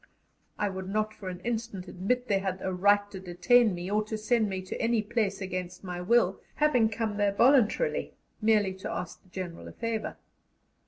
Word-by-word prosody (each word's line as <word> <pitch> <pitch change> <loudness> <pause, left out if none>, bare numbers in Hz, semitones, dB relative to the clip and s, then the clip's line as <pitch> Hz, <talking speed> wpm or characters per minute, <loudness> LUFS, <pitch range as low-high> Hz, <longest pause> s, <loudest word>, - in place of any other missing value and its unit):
I 210 - +1
would 190 -1 -5
not 215 +1 0
for 195 -4 -7
an 180 0 -7
instant 225 -5 -3
admit 245 +8 -1
they 200 -1 +2
had 190 -1 -3
a 190 - -1
right 205 +2 +4
to 190 - -7
detain 190 +4 +3
me 175 +2 -5
or 210 +1 +2
to 220 0 -3
send 215 0 +1
me 190 -1 -3
to 185 - -5
any 230 -1 +2
place 210 -3 -1
against 185 -1 -5
my 180 -1 -5
will, 195 -1 +3
having 255 -7 +3
come 220 -1 -2
there 205 -1 +2
voluntarily, 260 - +3 0.3
merely 210 -3 +3
to 190 - -6
ask 175 0 -5
the 185 - -25
General 180 -2 -6
a - - -9
favour. 230 -1 -3
205 Hz, 195 wpm, -29 LUFS, 185-225 Hz, 0.3 s, right